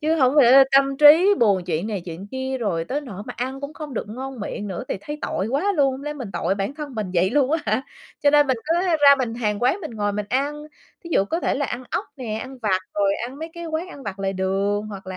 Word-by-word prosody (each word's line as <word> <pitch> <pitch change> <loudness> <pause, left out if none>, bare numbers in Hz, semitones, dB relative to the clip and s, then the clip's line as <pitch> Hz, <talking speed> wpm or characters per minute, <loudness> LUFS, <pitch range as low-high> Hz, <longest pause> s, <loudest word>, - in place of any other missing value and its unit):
Chứ 315 +2 +1
hổng 265 -2 +3
lẽ 270 0 +8
tâm 275 0 +4
trí 320 +8 +7
buồn 200 -6 +3
chuyện 170 +2 -2
này 210 -3 -3
chuyện 175 +3 -8
kia, 260 0 -3
rồi 175 -8 -1
tới 275 +10 -2
nỗi 210 -9 -8
mà - - -7
ăn 260 +3 -4
cũng 280 +2 -6
không 300 -5 -7
được 210 - -4
ngon 260 +1 -7
miệng 205 0 -5
nữa, 185 -3 -5
thì - - -2
thấy 295 +6 -6
tội 195 - -2
quá 325 +11 +1
luôn, 275 -2 +4
hông 265 +2 -7
lẽ 295 0 -3
mình 250 -9 -7
tội 185 +4 0
bản 200 +8 -3
thân 295 -4 -7
mình 210 -4 -3
vậy 180 +3 +3
luôn 280 -2 +2
á 325 - +3
hả! 215 +5 +1 0.4
Cho 285 - +5
nên 290 0 +5
mình 260 -2 +1
cứ 330 - +2
ra 295 -5 +6
mình 235 -3 -2
hàng 215 -2 -2
quán 335 +11 +2
mình 315 - -6
ngồi 205 -2 -2
mình 205 0 -3
ăn. 290 +3 -1 0.4
Thí 335 - -9
dụ 195 - +3
có 330 +11 -2
thể - - 0
là 285 0 -1
ăn 245 - -5
ốc - - -1
nè, 230 -5 -4
ăn 260 +2 -8
vặt 210 -5 +1 0.2
rồi 200 -1 +2
ăn 265 +3 -10
mấy 320 +1 -6
cái 340 0 -7
quán 320 +3 -3
ăn 280 - -11
vặt 195 -5 -6
lề 195 0 -1
đường, 195 +2 -1
hoặc 195 -3 -9
là 185 - -6
255 Hz, 275 wpm, -23 LUFS, 205-290 Hz, 0.4 s, lẽ